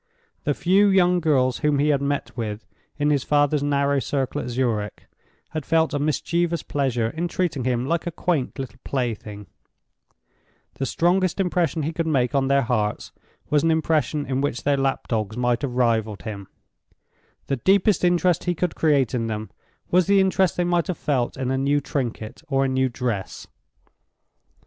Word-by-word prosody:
The - - +1
few 195 +3 +3
young 180 -2 +4
girls 135 -6 +2
whom 150 -2 +2
he 145 +2 +2
had 140 -2 +2
met 140 0 -2
with, 110 -2 -4 0.3
in 150 0 +1
his 140 -3 +1
father's 145 0 +2
narrow 140 -1 +1
circle 135 +1 -2
at - - -5
Zurich, 115 -5 -2 0.4
had 155 -2 -4
felt 160 +2 +1
a 145 - 0
mischievous 170 +3 0
pleasure 125 -5 -1
in 170 +2 -2
treating 170 -7 -2
him 125 -1 0
like 170 +4 -1
a - - -1
quaint 160 -6 -1
little 130 -2 -7
plaything; 110 -5 -4 1.3
the 135 - -3
strongest 180 +4 +1
impression 175 -4 0
he 160 +3 -2
could 165 0 -2
make 135 -4 +1
on 135 -1 +2
their 140 0 +3
hearts 110 -3 -1 0.4
was 150 -1 +4
an 165 - +2
impression 155 -2 +1
in 130 +1 -1
which 140 -4 -2
their 145 0 +2
lap 135 -1 -1
dogs 110 -1 -2
might 120 -1 +1
have 130 -4 -3
rivaled 110 -4 0
him; 100 -3 -6 1.0
the 135 - -1
deepest 195 - +3
interest 175 -1 +2
he 175 -1 0
could 175 0 -1
create 145 -6 +2
in 115 -2 -1
them 110 -1 -4 0.4
was 180 -1 +4
the 200 0 +5
interest 190 -1 +2
they 175 - +2
might 175 -1 +1
have 180 - -2
felt 130 -5 -1
in 130 -1 -2
a 130 - 0
new 140 +2 +2
trinket 120 -6 -4
or 135 -1 +1
a - - +1
new 130 0 +1
dress. 115 -5 -4
140 Hz, 180 wpm, -23 LUFS, 125-165 Hz, 1.3 s, the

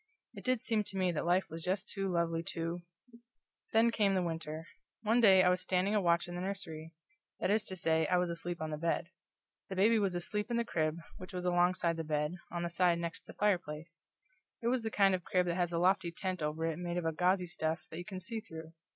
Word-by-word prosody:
It - - -10
did 255 -3 +1
seem 220 -2 +1
to 195 - -6
me 185 -1 +2
that 170 0 -2
life 180 +1 +3
was 165 +1 -6
just 185 +4 -1
too 195 -1 -2
lovely 170 -1 +1
to 165 +1 -2 0.9
Then 225 +1 +5
came 205 -4 +2
the 185 - +2
winter. 160 -1 -4 0.4
One 225 +3 +3
day 190 -4 +7
I 180 - +5
was 180 0 +2
standing 185 +2 +1
a 210 - +3
watch 170 -1 +2
in 175 - -7
the 175 - -4
nursery. 165 -5 -5 0.4
That 185 - +1
is 215 +1 +2
to 190 - -3
say, 160 -2 +2
I 180 - +3
was 180 -1 +1
asleep 170 0 -5
on 155 - -3
the 150 - -3
bed. 170 +1 0 0.6
The 190 - -4
baby 220 +4 +4
was 195 -3 0
asleep 210 +5 -2
in 235 - 0
the 235 - +1
crib, 155 -6 0 0.2
which 185 +1 -10
was 180 0 -3
alongside 175 -1 +2
the 165 - -2
bed, 150 0 -1 0.2
on 175 0 -2
the 170 - -1
side 175 0 +3
next 170 -1 -5
the - - -9
fireplace. 170 -5 -1 0.6
It 235 - +2
was 255 0 +1
the 225 - -2
kind 195 -3 +4
of 180 -1 -1
crib 180 0 +1
that 175 - 0
has 175 -1 0
a 170 - -1
lofty 185 0 +2
tent 185 0 -3
over 155 +2 -1
it 165 0 -2
made 175 0 -3
of 165 -2 -1
gauzy 180 +2 +2
stuff 165 -1 -2
that 160 - -6
you 175 - -6
can 190 -2 -6
see 225 +5 -4
through. 160 -5 -10
175 Hz, 240 wpm, -33 LUFS, 165-195 Hz, 0.9 s, day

